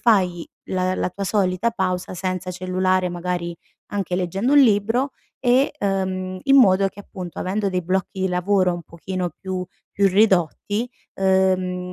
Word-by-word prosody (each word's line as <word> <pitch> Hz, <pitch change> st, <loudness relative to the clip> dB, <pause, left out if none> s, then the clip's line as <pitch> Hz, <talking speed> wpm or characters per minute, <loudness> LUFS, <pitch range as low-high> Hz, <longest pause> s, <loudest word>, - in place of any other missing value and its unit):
fai 185 Hz, -7 st, +2 dB, 0.2 s
la 185 Hz, 0 st, 0 dB
la 185 Hz, -, -1 dB
tua 195 Hz, +2 st, -5 dB
solita 195 Hz, +2 st, +1 dB
pausa 185 Hz, -3 st, -2 dB
senza 185 Hz, 0 st, -3 dB
cellulare, 185 Hz, 0 st, 0 dB
magari 175 Hz, -1 st, -3 dB, 0.4 s
anche 195 Hz, -3 st, -2 dB
leggendo 190 Hz, +8 st, 0 dB
un 290 Hz, -, +8 dB
libro 230 Hz, +3 st, +3 dB, 0.3 s
e 255 Hz, +2 st, +3 dB
uhm, 185 Hz, -1 st, -1 dB
in 275 Hz, 0 st, +5 dB
modo 195 Hz, -6 st, +6 dB
che, 200 Hz, -, -12 dB
appunto, 185 Hz, -4 st, -8 dB
avendo 200 Hz, +2 st, -1 dB
dei 180 Hz, -1 st, -1 dB
blocchi 190 Hz, +2 st, -2 dB
di 190 Hz, -, +1 dB
lavoro 180 Hz, 0 st, +2 dB
un 175 Hz, -, -5 dB
pochino 180 Hz, +2 st, -4 dB
più 185 Hz, -1 st, -4 dB, 0.2 s
più 200 Hz, -, +2 dB
ridotti, 205 Hz, +3 st, +2 dB, 0.3 s
uhm, 185 Hz, -1 st, +1 dB
185 Hz, 150 wpm, -22 LUFS, 180-200 Hz, 0.4 s, un